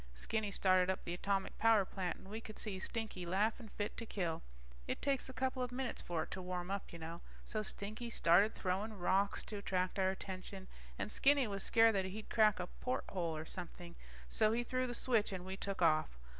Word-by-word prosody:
Skinny 210 - -1
started 185 -2 +4
up 190 - -1
the 170 - -2
atomic 195 +2 -1
power 225 -3 +5
plant, 180 -2 -3
and - - -14
we 215 +3 -5
could 215 -1 -9
see 200 -4 -3
Stinky 220 -3 -3
laughing 210 +6 0
fit 205 0 -3
to 230 - -4
kill. 175 -7 -2 0.5
It - - -1
takes 275 -2 0
a - - -4
couple 260 0 -1
of 250 -1 -1
minutes 255 0 -2
for 165 -2 -1
it - - -12
to 190 - -4
warm 180 0 -3
up, 200 0 -3
you 170 - -7
know. 165 +1 -6 0.2
So 215 - -1
Stinky 215 +3 -4
started 200 0 +4
throwing 200 +3 -1
rocks 195 +2 +2
to 210 - -5
attract 185 -1 -1
our 190 0 +4
attention, 190 0 -5 0.3
and 215 - -3
Skinny 280 -1 +4
was 200 -3 -3
scared 225 +1 +5
that 190 -2 +1
he'd 210 +3 -6
crack 215 -3 +5
a 180 - -1
porthole 180 -7 -2
or 155 - -5
something, 175 0 -7 0.3
so 215 - +3
he 240 +1 +1
threw 255 +1 0
the 245 - -3
switch 230 -4 +2
and 185 -2 -4
we 190 0 -4
took 195 -2 -2
off. 155 - +3
195 Hz, 210 wpm, -37 LUFS, 180-220 Hz, 0.5 s, power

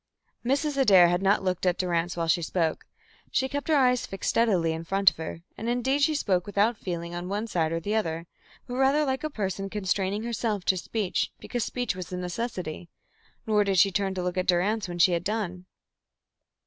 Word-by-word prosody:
Mrs. 280 +3 0
Adair 195 -10 +6
had 175 +1 +1
not 195 +1 +3
looked 185 -2 -1
at 180 -1 +2
Durrance 175 -1 -1
while 165 -1 -1
she 170 +2 +3
spoke. 165 -1 -1 0.4
She 265 - +1
kept 285 +1 -4
her 315 - +3
eyes 250 -3 +3
fixed 195 - -2
steadily 185 -8 +2
in 160 +1 -5
front 195 +1 +4
of - - -19
her, 165 +1 -6
and 225 - -4
indeed 260 +4 +1
she 310 +2 +3
spoke 190 -10 0
without 205 +3 +2
feeling 170 -4 -5
on 175 +1 -5
one 205 +3 -2
side 165 -7 0
or 165 - -1
the 205 +5 -3
other, 165 -6 -1 0.4
but 245 0 -5
rather 275 +3 +3
like 265 0 -2
a 310 - -1
person 195 -6 -3
constraining 195 +1 -1
herself 220 -4 -2
to 190 - +3
speech 200 +1 -2
because 245 -2 -3
speech 245 -5 -2
was 185 -1 -7
a 180 - -3
necessity. 180 -3 -4 0.6
Nor 210 -2 +3
did 195 -2 0
she 195 +3 +5
turn 195 0 -1
to 180 - -2
look 180 0 -2
at 180 - -2
Durrance 195 +4 +1
when 175 -1 -6
she 175 +1 +5
had 170 0 0
done. 185 -3 -3
195 Hz, 210 wpm, -27 LUFS, 175-230 Hz, 0.6 s, Adair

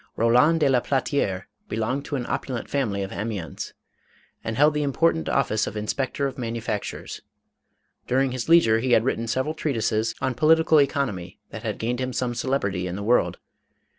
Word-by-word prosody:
Roland 125 +8 +4
de 145 - +5
la 130 -2 +4
Platiere 130 -8 -1 0.3
belonged 125 +6 -2
to 145 - -3
an 125 -3 -2
opulent 125 -2 -3
family 105 -9 -1
of 95 - -6
Amiens, 105 -5 -5 0.7
and 110 0 -3
held 150 +1 +5
the 150 - 0
important 160 +3 +1
of 140 - +2
fice 110 - 0
of - - -5
inspector 130 +6 -2
of 135 -1 -4
manufactures. 115 -3 -4 0.9
During 130 +1 +2
his 130 +3 -4
leisure 115 -10 +6
he 125 +1 +1
had 110 - +5
written 115 -2 -1
several 130 +6 -1
treatises 115 -7 -1
on 130 - 0
political 160 +2 +5
economy 120 - -2
that 110 - -7
had 110 -2 -3
gained 120 +3 -2
him 130 0 -2
some 125 -1 -1
celebrity 100 -8 -1
in 90 - -4
the 100 - -5
world. 120 +4 +2
125 Hz, 175 wpm, -24 LUFS, 110-140 Hz, 0.9 s, leisure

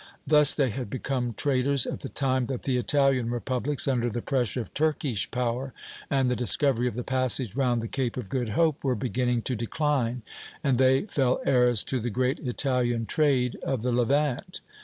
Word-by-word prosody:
Thus 150 -1 +5
they 135 -5 +1
had 125 0 -5
become 125 -1 -3
traders 140 0 +1
at - - -4
the 135 - -7
time 130 -3 0
that 130 -3 -4
the 130 - 0
Italian 135 -1 +2
republics, 125 +4 -1
under 120 -3 +1
the 120 +1 -4
pressure 125 -3 -1
of - - -10
Turkish 145 -7 0
power 125 +1 -2 0.4
and 135 -2 +2
the 125 - +1
discovery 125 0 +2
of 120 - -3
the 125 - -3
passage 130 -4 0
round 125 -4 +1
the - - -3
Cape 130 -1 -2
of 125 -6 -5
Good 125 0 -2
Hope, 160 -3 +2
were 130 -3 +1
beginning 125 +1 -1
to 130 - -1
decline, 125 0 -1 0.4
and 130 -4 +1
they 130 0 +4
fell 135 - 0
heirs 125 -4 +3
to 130 - -2
the 120 +1 -3
great 130 +6 0
Italian 125 -3 -1
trade 130 -3 +1
of 130 -5 -2
the 125 - 0
Levant. 140 +7 0
130 Hz, 185 wpm, -26 LUFS, 120-135 Hz, 0.4 s, Thus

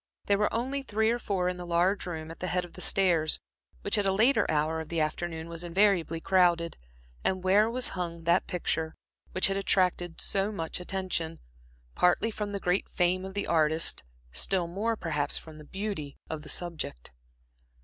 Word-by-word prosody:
There 200 0 +2
were 210 - +2
only 265 +4 -1
three 220 -3 +1
or 240 - 0
four 190 -5 0
in 180 0 -1
the 180 - -6
large 175 +3 +1
room 160 -2 -5
at 165 - -11
the 180 - -2
head 180 +1 0
of 175 - -15
the 185 - -7
stairs, 170 -6 +3 0.4
which - - +3
at 205 - +1
a - - +3
later 225 +8 +3
hour 155 +1 +1
of 160 - -9
the 170 - -1
afternoon 160 +1 -2
was 170 0 -5
invariably 175 -2 +2
crowded, 175 -2 +3 0.5
and 185 -1 0
where 205 +4 +5
was 250 +1 0
hung 170 -2 -4
that 170 +2 +3
picture 160 -2 -2 0.4
which 185 - +3
had 195 0 +2
attracted 180 -3 +1
so 195 +1 0
much 165 -5 -4
attention, 180 -3 -2 0.5
partly 180 +5 +3
from 210 -1 -4
the 200 - -2
great 180 +1 +1
fame 180 +1 +1
of 190 0 -7
the 200 - -1
artist, 160 - +2 0.3
still 175 - +1
more, 205 +7 -1
perhaps, 150 -7 -1
from 155 -1 -10
the - - -10
beauty 190 -7 -4
of 160 -1 -4
the 150 - -10
subject. 155 - -3
180 Hz, 190 wpm, -29 LUFS, 165-195 Hz, 0.5 s, where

